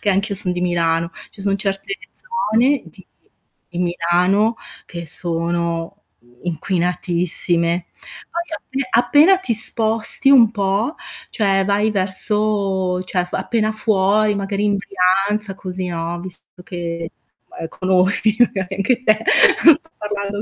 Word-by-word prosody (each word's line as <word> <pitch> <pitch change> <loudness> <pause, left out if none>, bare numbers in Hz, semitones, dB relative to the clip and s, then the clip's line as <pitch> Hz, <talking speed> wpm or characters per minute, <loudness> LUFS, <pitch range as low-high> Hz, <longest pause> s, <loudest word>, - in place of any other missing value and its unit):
che 205 - +1
anch'io 200 +2 0
son 190 -2 -2
di 180 - -3
Milano, 170 -2 0 0.2
ci - - -14
sono 195 0 0
certe 195 0 -3 0.2
zone 285 - 0
di - - -14 0.6
di 175 - -7
Milano 180 +5 +2 0.3
che 170 -1 -7
sono, 170 +2 -3 0.2
mhmm, 120 +1 -26
inquinatissime. 175 0 -1 0.4
Poi 340 0 -2
appe 270 -4 -5
appena 295 +10 +5
ti 260 -11 -1
sposti 225 +4 0
un 240 -6 +7
po', 205 +6 0 0.4
cioè 195 -3 +1
vai 205 +2 +2
verso 195 -1 0
cioè, 180 -1 -1
f 180 - -16
appena 220 -2 0
fuori, 215 -1 +2
magari 200 0 -2
in 205 -1 +2
Brianza, 195 +2 0
così, 185 -1 -5
no, 170 0 -3
visto 180 0 -11
che 170 -2 -5 0.4
ma - - -15
ehm, 165 - -5
conosci 190 +4 +1
magari 195 -6 +1
anche 235 +6 +1
te, 215 -3 +3 0.5
non 330 - +10
sto 325 +2 -12
parlando 205 -1 -4
195 Hz, 135 wpm, -19 LUFS, 180-215 Hz, 0.6 s, non